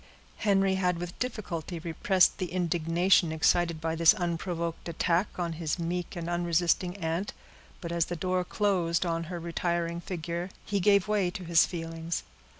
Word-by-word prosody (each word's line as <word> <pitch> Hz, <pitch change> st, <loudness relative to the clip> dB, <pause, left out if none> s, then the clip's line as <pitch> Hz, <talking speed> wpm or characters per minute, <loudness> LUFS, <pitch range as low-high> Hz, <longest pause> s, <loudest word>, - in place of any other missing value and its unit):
Henry 195 Hz, -2 st, +2 dB
had 180 Hz, -1 st, +1 dB
with 175 Hz, 0 st, -6 dB
difficulty 185 Hz, -, -4 dB
repressed 170 Hz, +3 st, +2 dB
the 185 Hz, -, -1 dB
indignation 175 Hz, 0 st, +2 dB
excited 165 Hz, +1 st, +2 dB
by 160 Hz, 0 st, -2 dB
this 165 Hz, +5 st, +6 dB
unprovoked 170 Hz, -2 st, -3 dB
attack 170 Hz, +3 st, +1 dB
on 170 Hz, -2 st, -2 dB
his 160 Hz, -1 st, -2 dB
meek 175 Hz, +1 st, -3 dB
and 170 Hz, -1 st, -4 dB
unresisting 175 Hz, +1 st, +1 dB
aunt; 170 Hz, +2 st, -2 dB, 0.5 s
but 170 Hz, -2 st, -5 dB
as 170 Hz, -1 st, +1 dB
the 175 Hz, -, -4 dB
door 185 Hz, +2 st, 0 dB
closed 180 Hz, -3 st, +1 dB
on 165 Hz, -1 st, -1 dB
her 175 Hz, +1 st, -5 dB
retiring 170 Hz, 0 st, -2 dB
figure, 170 Hz, 0 st, -4 dB, 0.2 s
he 200 Hz, -1 st, 0 dB
gave 200 Hz, 0 st, +4 dB
way 205 Hz, -4 st, +2 dB
to 185 Hz, +1 st, -7 dB
his 165 Hz, -1 st, +5 dB
feelings. 165 Hz, -1 st, -4 dB
175 Hz, 155 wpm, -29 LUFS, 165-185 Hz, 0.5 s, this